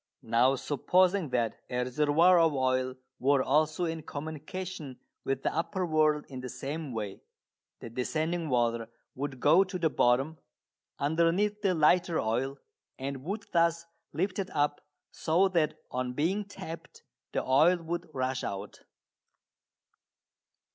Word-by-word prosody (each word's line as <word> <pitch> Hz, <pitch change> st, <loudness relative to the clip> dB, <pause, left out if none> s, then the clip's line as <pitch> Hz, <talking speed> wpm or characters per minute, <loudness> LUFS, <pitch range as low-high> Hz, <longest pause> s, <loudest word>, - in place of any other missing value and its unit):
Now 120 Hz, +4 st, +3 dB
supposing 180 Hz, +6 st, +2 dB
that 120 Hz, -3 st, -1 dB
a 125 Hz, 0 st, 0 dB
reservoir 150 Hz, +7 st, +4 dB
of 165 Hz, -2 st, +4 dB
oil 130 Hz, -1 st, +1 dB, 0.2 s
were 135 Hz, 0 st, +3 dB
also 155 Hz, +4 st, +2 dB
in 165 Hz, -1 st, -3 dB
communication 155 Hz, 0 st, -6 dB, 0.3 s
with 135 Hz, 0 st, -2 dB
the -, -, 0 dB
upper 185 Hz, +3 st, -1 dB
world 155 Hz, -2 st, +2 dB
in 130 Hz, -2 st, -7 dB
the 125 Hz, -, -6 dB
same 145 Hz, +2 st, -5 dB
way, 105 Hz, -4 st, -5 dB, 0.6 s
the -, -, -7 dB
descending 155 Hz, +7 st, -1 dB
water 115 Hz, -2 st, +1 dB, 0.2 s
would 135 Hz, -1 st, -5 dB
go 160 Hz, +8 st, +6 dB
to 185 Hz, -1 st, -5 dB
the 165 Hz, -3 st, +1 dB
bottom, 135 Hz, +7 st, +2 dB, 0.6 s
underneath 170 Hz, +8 st, +1 dB
the 190 Hz, -3 st, +2 dB
lighter 170 Hz, +2 st, +3 dB
oil, 125 Hz, +5 st, -1 dB, 0.4 s
and 135 Hz, 0 st, -5 dB
would 200 Hz, +6 st, -4 dB
thus 170 Hz, 0 st, +2 dB, 0.3 s
lift 185 Hz, +3 st, -1 dB
it 190 Hz, -, -2 dB
up, 145 Hz, 0 st, +1 dB, 0.3 s
so 170 Hz, +4 st, +2 dB
that 165 Hz, -5 st, +1 dB, 0.2 s
on 125 Hz, 0 st, -2 dB
being 185 Hz, +10 st, 0 dB
tapped 165 Hz, -4 st, -9 dB, 0.3 s
the -, -, -1 dB
oil 155 Hz, +8 st, +4 dB
would 170 Hz, +1 st, -5 dB
rush 130 Hz, -2 st, -2 dB
out. 100 Hz, +1 st, -5 dB
155 Hz, 135 wpm, -30 LUFS, 130-170 Hz, 0.6 s, go